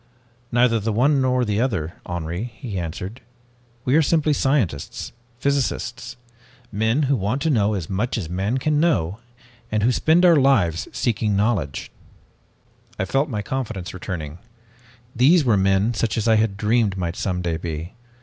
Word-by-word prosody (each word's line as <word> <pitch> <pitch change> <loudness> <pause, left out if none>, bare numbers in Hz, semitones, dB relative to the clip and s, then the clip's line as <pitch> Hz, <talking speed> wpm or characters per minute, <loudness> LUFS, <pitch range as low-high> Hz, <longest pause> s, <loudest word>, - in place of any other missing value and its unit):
"'Neither 120 -1 +3
the 110 +2 -1
one 135 +6 +3
nor 125 -1 +2
the 105 0 0
other, 95 -11 -1
Henri,' 85 +6 -4
he 110 -6 -5
answered. 90 +7 -6 0.6
'We 130 +4 +3
are - - +5
simply 155 -1 +2
scientists, 135 - -1 0.3
physicists 125 -4 -2 0.5
men 110 +7 +1
who 140 0 +2
want 110 +4 -1
to 160 - +2
know 105 -4 +2
as 90 -5 -4
much 105 +6 -1
as 95 -8 -3
man 95 +8 -1
can 150 +3 +1
know 110 - +1 0.5
and 110 -1 0
who 120 - +4
spend 160 +8 +3
our 170 -3 +6
lives 110 - +2
in - - -18
seeking 110 -3 0
knowledge.' 100 -9 -1 1.1
"I 95 - -1
felt 135 +9 0
my 105 -5 -3
confidence 110 -7 -4
returning. 90 -4 -6 0.8
These 145 +6 +5
were 115 -4 +4
men 95 +3 +2
such 110 -2 -1
as 110 - 0
I 110 - +5
had 110 -2 0
dreamed 105 -1 +1
might 85 -2 -2
some 90 -2 -2
day 85 -2 -1
be. 80 +2 -5
110 Hz, 165 wpm, -22 LUFS, 95-130 Hz, 1.1 s, our